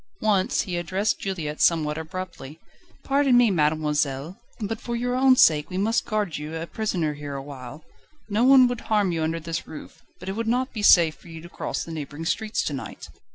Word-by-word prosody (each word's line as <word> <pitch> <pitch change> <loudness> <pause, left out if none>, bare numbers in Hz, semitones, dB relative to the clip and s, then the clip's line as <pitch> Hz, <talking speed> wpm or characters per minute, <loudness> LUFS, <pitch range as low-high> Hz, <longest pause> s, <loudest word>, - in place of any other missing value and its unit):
Once 205 -3 +2
he 180 -2 -4
addressed 185 +5 -1
Juliette 165 -6 -4
somewhat 155 -3 +3
abruptly: 160 -3 -7 0.4
"Pardon 275 -2 +3
me, 240 -3 +5
mademoiselle, 150 -1 0 0.2
but 220 +1 -4
for 235 - -4
your 245 +1 -1
own 260 0 +5
sake 150 -10 +4
we 185 - -4
must 225 +4 +1
guard 210 -8 -1
you 150 +2 -6
a 165 0 -4
prisoner 175 -7 -2
here 145 -1 -7
awhile. 135 +1 -8 0.4
No 215 +2 +1
one 260 -1 +7
would 245 -2 -4
harm 205 -4 +2
you 165 -1 -2
under 160 +1 -1
this 165 0 -5
roof, 155 - -11 0.2
but 180 - -10
it - - -1
would 230 +1 -3
not 250 +3 0
be 215 - -4
safe 170 -5 +6
for 140 - -19
you 165 -1 -9
to 175 - -12
cross - - -4
the 165 - -9
neighbouring 150 0 -6
streets 215 +6 -1
to 145 - -3
night." 135 - -7
175 Hz, 200 wpm, -24 LUFS, 155-220 Hz, 0.4 s, one